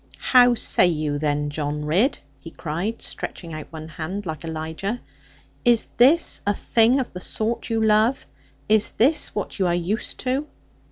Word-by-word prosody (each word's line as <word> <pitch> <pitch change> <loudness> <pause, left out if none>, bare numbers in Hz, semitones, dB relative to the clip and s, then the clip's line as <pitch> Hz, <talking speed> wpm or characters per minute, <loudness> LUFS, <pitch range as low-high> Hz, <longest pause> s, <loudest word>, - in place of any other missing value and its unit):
'How 245 -1 +5
say 185 - +3
you 150 -3 -1
then, 145 -1 -1
John 150 0 -3
Ridd,' 195 - +2 0.2
he 165 - -10
cried, 175 +8 -4
stretching 165 -3 -6
out 155 -1 -7
one 160 -1 -8
hand, 170 +6 -5
like 160 -1 -5
Elijah; 160 +7 -4 0.6
'is 240 -2 +4
this 285 +8 +4
a 205 - +2
thing 235 +5 +3
of 255 - -4
the 180 - -7
sort 225 +5 -2
you 225 -1 0
love? 220 +4 +3 0.4
Is 215 -1 +3
this 280 +8 +3
what 205 - -4
you 185 - +2
are 175 - +1
used 180 +6 -3
to?' 265 +4 -1
195 Hz, 165 wpm, -23 LUFS, 160-235 Hz, 0.6 s, How